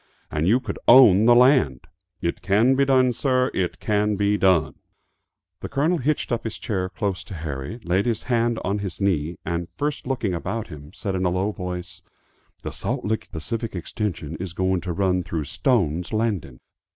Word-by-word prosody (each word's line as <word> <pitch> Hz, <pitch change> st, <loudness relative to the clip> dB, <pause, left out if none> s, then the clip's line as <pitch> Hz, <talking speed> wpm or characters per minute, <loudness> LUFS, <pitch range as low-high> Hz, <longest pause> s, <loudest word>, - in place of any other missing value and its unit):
and 75 Hz, +2 st, 0 dB
you 115 Hz, +6 st, +4 dB
could 110 Hz, -6 st, -6 dB
own 110 Hz, -5 st, +8 dB
the 120 Hz, 0 st, +7 dB
land! 125 Hz, -5 st, +4 dB, 0.4 s
It 85 Hz, -, -2 dB
can 105 Hz, +7 st, +3 dB
be 140 Hz, +1 st, +3 dB
done, 130 Hz, -2 st, +3 dB
sir. 130 Hz, +1 st, +1 dB
It 90 Hz, -2 st, -2 dB
can 105 Hz, 0 st, +1 dB
be 100 Hz, +1 st, +1 dB
done!" 95 Hz, -5 st, +3 dB, 0.9 s
The -, -, -6 dB
Colonel 155 Hz, +5 st, +1 dB
hitched 150 Hz, +2 st, -1 dB
up 120 Hz, -, -1 dB
his 110 Hz, -, -5 dB
chair 95 Hz, -4 st, -2 dB
close 100 Hz, -2 st, -3 dB
to 95 Hz, -, -8 dB
Harry, 80 Hz, -, -5 dB
laid 95 Hz, +5 st, +1 dB
his 115 Hz, -2 st, -1 dB
hand 120 Hz, -1 st, +1 dB
on 100 Hz, +3 st, -1 dB
his 95 Hz, -4 st, -5 dB
knee, 85 Hz, -4 st, 0 dB
and, 85 Hz, 0 st, -2 dB
first 145 Hz, -3 st, -2 dB
looking 120 Hz, -8 st, -1 dB
about 110 Hz, +6 st, -4 dB
him, 75 Hz, -2 st, -10 dB
said 100 Hz, +1 st, -4 dB
in 95 Hz, 0 st, -1 dB
a 90 Hz, -, +2 dB
low 95 Hz, +4 st, 0 dB
voice, 90 Hz, -1 st, -6 dB, 0.6 s
"The -, -, -4 dB
Salt -, -, -3 dB
Lick 110 Hz, +1 st, -2 dB
Pacific 110 Hz, +6 st, -4 dB
Extension 85 Hz, -3 st, -4 dB
is 90 Hz, -2 st, -6 dB
going 95 Hz, 0 st, 0 dB
to 90 Hz, -, -4 dB
run 90 Hz, 0 st, +1 dB
through 85 Hz, -3 st, -3 dB
Stone's 90 Hz, -, 0 dB
Landing! 110 Hz, -, -2 dB
100 Hz, 185 wpm, -23 LUFS, 90-115 Hz, 0.9 s, own